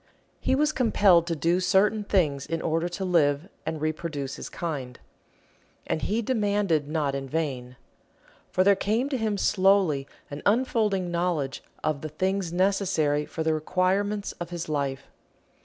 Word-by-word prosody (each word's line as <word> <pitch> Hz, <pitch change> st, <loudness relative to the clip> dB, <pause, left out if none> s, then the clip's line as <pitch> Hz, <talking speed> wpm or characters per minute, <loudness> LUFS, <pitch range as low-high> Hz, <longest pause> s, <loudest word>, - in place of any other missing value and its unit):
He -, -, +1 dB
was 300 Hz, +2 st, +2 dB
compelled 200 Hz, -, +4 dB
to 170 Hz, -, -1 dB
do 170 Hz, +4 st, +1 dB
certain 195 Hz, +4 st, +2 dB
things 155 Hz, -9 st, +1 dB
in 165 Hz, 0 st, -2 dB
order 165 Hz, +2 st, -1 dB
to 190 Hz, +2 st, -4 dB
live 155 Hz, -3 st, +2 dB, 0.2 s
and 160 Hz, -, -2 dB
reproduce 155 Hz, -3 st, -3 dB
his -, -, -7 dB
kind. 140 Hz, -8 st, -5 dB, 0.9 s
And 155 Hz, -, -2 dB
he 225 Hz, +3 st, 0 dB
demanded 205 Hz, -, +1 dB
not 150 Hz, -2 st, -1 dB
in 135 Hz, -1 st, -4 dB
vain. 130 Hz, -5 st, -3 dB, 0.7 s
For 185 Hz, -, +2 dB
there 200 Hz, +1 st, +5 dB
came 220 Hz, +7 st, 0 dB
to 270 Hz, -, -1 dB
him 215 Hz, -2 st, 0 dB
slowly 190 Hz, -8 st, +3 dB, 0.2 s
an 145 Hz, -, -6 dB
unfolding 210 Hz, -5 st, +1 dB
knowledge 170 Hz, -7 st, -1 dB, 0.2 s
of 155 Hz, -2 st, -1 dB
the 155 Hz, -, -5 dB
things 185 Hz, +3 st, -1 dB
necessary 175 Hz, -6 st, +1 dB
for 160 Hz, -, -4 dB
the 160 Hz, 0 st, +2 dB
requirements 190 Hz, +6 st, 0 dB
of 175 Hz, -1 st, -5 dB
his 175 Hz, -1 st, -5 dB
life. 140 Hz, -3 st, -2 dB
175 Hz, 155 wpm, -26 LUFS, 150-200 Hz, 0.9 s, there